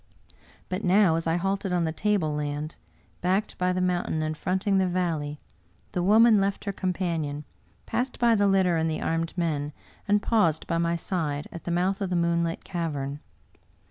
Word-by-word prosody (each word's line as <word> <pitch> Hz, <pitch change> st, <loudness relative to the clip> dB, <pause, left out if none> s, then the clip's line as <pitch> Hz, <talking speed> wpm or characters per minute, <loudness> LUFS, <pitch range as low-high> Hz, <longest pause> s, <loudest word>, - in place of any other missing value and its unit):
But 185 Hz, +3 st, -3 dB
now, 185 Hz, -2 st, +4 dB
as 165 Hz, 0 st, -2 dB
I 165 Hz, -, +2 dB
halted 195 Hz, +2 st, -1 dB
on 175 Hz, -1 st, +1 dB
the 160 Hz, -, 0 dB
tableland, 155 Hz, -5 st, -1 dB, 0.5 s
backed 190 Hz, +4 st, 0 dB
by 180 Hz, 0 st, +2 dB
the 180 Hz, -, -1 dB
mountain 175 Hz, -3 st, 0 dB
and 155 Hz, 0 st, -2 dB
fronting 190 Hz, +4 st, +1 dB
the 190 Hz, -, +2 dB
valley, 165 Hz, -5 st, -1 dB, 0.5 s
the 180 Hz, -, -1 dB
woman 215 Hz, +3 st, +6 dB
left 195 Hz, +1 st, -1 dB
her 200 Hz, -, -2 dB
cotn 185 Hz, -1 st, -1 dB
panion, 160 Hz, -5 st, -2 dB, 0.4 s
passed 245 Hz, +3 st, -2 dB
by 235 Hz, -1 st, +4 dB
the 205 Hz, -2 st, +3 dB
litter 190 Hz, -3 st, +3 dB
and 160 Hz, 0 st, +1 dB
the 155 Hz, -, -2 dB
armed 165 Hz, +2 st, -1 dB
men, 150 Hz, -4 st, -1 dB, 0.3 s
and 205 Hz, 0 st, +4 dB
paused 190 Hz, -8 st, +2 dB
by 165 Hz, -1 st, -1 dB
my 170 Hz, 0 st, +1 dB
side, 155 Hz, -4 st, -2 dB
at 170 Hz, -, -9 dB
the -, -, -3 dB
mouth 185 Hz, +4 st, 0 dB
of 195 Hz, -, -1 dB
the 180 Hz, -, 0 dB
moonlit 170 Hz, -1 st, 0 dB
cavern. 145 Hz, -6 st, -3 dB
175 Hz, 180 wpm, -26 LUFS, 160-195 Hz, 0.5 s, woman